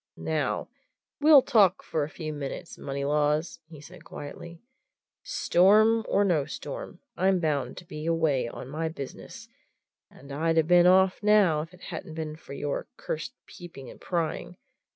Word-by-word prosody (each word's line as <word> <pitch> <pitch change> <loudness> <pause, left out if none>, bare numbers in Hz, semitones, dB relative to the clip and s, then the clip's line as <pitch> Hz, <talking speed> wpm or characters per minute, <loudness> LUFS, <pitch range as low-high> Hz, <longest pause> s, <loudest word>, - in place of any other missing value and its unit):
"Now, - - -2 0.5
we'll 295 -2 +7
talk 200 -7 +3
for 155 - -1
a 145 - -4
few 155 -1 -6
minutes, 145 +3 -6
Moneylaws," 150 +3 -1
he 155 -2 -12
said 145 - -13
quietly, 170 +4 -9 0.6
"Storm 220 - +4
or 200 - +3
no 170 -7 +2
storm, 150 - -7
I'm 190 0 +2
bound 145 -6 -1
to 180 - -10
be 155 -1 -7
away 160 -7 +1
on 120 - -8
my 160 +4 -3
business, 140 -4 -9 0.6
and 140 +1 -14
I'd 165 +3 0
have 160 -1 +3
been 175 0 +6
off 190 +1 +4
now 205 -7 +4
if 160 +2 -9
it 180 -1 -18
hadn't 160 -2 -7
been 155 -1 -4
for 155 - -12
your 145 0 -3
cursed 160 +11 -5
peeping 165 -7 -11
and - - -16
prying. 175 0 -3
160 Hz, 155 wpm, -27 LUFS, 150-180 Hz, 0.6 s, we'll